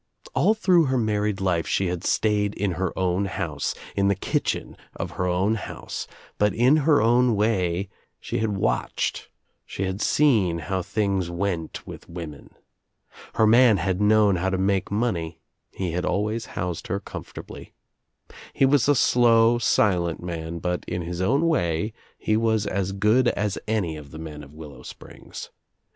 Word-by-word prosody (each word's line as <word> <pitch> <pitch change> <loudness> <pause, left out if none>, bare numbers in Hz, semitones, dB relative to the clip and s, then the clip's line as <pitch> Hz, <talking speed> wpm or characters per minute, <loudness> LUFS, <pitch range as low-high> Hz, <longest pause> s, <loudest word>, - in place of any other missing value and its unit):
All 215 - +3
through 180 -6 +4
her 130 -1 +1
married 105 -3 0
life 90 -4 0
she 95 - +1
had 90 -1 -3
stayed 105 -1 +1
in 100 -1 -1
her 95 +2 -2
own 95 +1 +1
house, 80 -6 -3 0.2
in 100 0 +2
the 100 - +3
kitchen 95 - -2 0.2
of - - -4
her 90 - -2
own 90 +4 +1
house, 110 - -6 0.3
but 105 -2 +2
in 125 +6 +5
her 150 -2 +4
own 120 +1 +3
way 95 -3 0 0.3
she - - -3
had 105 -2 -1
watched, - - -1 0.3
she 95 - -5
had 95 +2 -3
seen 110 - +3
how 95 +4 -2
things 100 -2 -1
went 85 -2 -3
with - - -10
women. 80 -4 -8 0.9
Her 110 - +4
man 115 -1 +6
had 95 0 -1
known 105 -2 +4
how 95 +2 0
to 95 - -1
make 95 0 0
money, 95 -7 -2 0.3
he 90 -3 -3
had 90 +2 -2
always 105 +4 -1
housed 85 -1 -3
her 100 - -1
comfortably. 100 - -9 0.8
He 135 - +3
was 140 -1 +3
a 145 - +5
slow, 120 -1 +4
silent 90 -8 +2
man 85 -1 -5
but 90 +1 -2
in 90 -1 -3
his 85 +1 -4
own 140 - +2
way 90 - 0 0.2
he 110 - 0
was 110 -1 +1
as 95 -1 -1
good 105 +6 +3
as 105 -4 -1
any 95 -8 -1
of 75 -2 -11
the 75 - -10
men 80 -2 -8
of 70 - -13
Willow 75 -5 -10
Springs. - - -10
100 Hz, 165 wpm, -24 LUFS, 90-110 Hz, 0.9 s, man